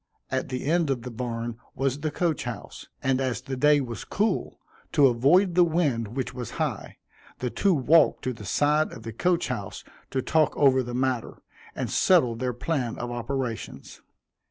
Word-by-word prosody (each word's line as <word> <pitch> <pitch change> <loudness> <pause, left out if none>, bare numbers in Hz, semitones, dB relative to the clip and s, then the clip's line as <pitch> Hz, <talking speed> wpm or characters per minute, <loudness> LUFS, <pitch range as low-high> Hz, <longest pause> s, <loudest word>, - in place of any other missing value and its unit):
At - - -1
the 130 0 -4
end 165 +1 +2
of 125 -4 -1
the 125 - -6
barn 115 -1 -4 0.2
was 135 +1 -1
the 155 +1 -1
coach 165 0 -1
house, - - -7 0.2
and 135 0 +1
as 125 -5 -1
the 130 +1 -5
day 150 +3 +4
was 120 -5 -5
cool, 210 -1 -1 0.3
to 145 - +6
avoid 140 +10 +4
the 180 +1 +6
wind 140 -10 0
which 130 -2 -3
was 125 -3 -5
high, - - -3 0.4
the 125 -1 -3
two 195 -3 +2
walked 155 +3 +4
to 130 - -1
the 110 - -11
side 150 - +2
of 115 - -10
the 115 0 -6
coach 175 - +1
house 105 -6 -5 0.3
to 130 - -2
talk 160 -1 +2
over 135 -2 +5
the 120 -1 -5
matter, 130 -2 -2 0.3
and - - -3
settle 155 -11 +4
their 125 +2 -2
plan 125 -1 -2
of 120 0 -4
operations. 120 0 -5
130 Hz, 180 wpm, -26 LUFS, 120-155 Hz, 0.4 s, to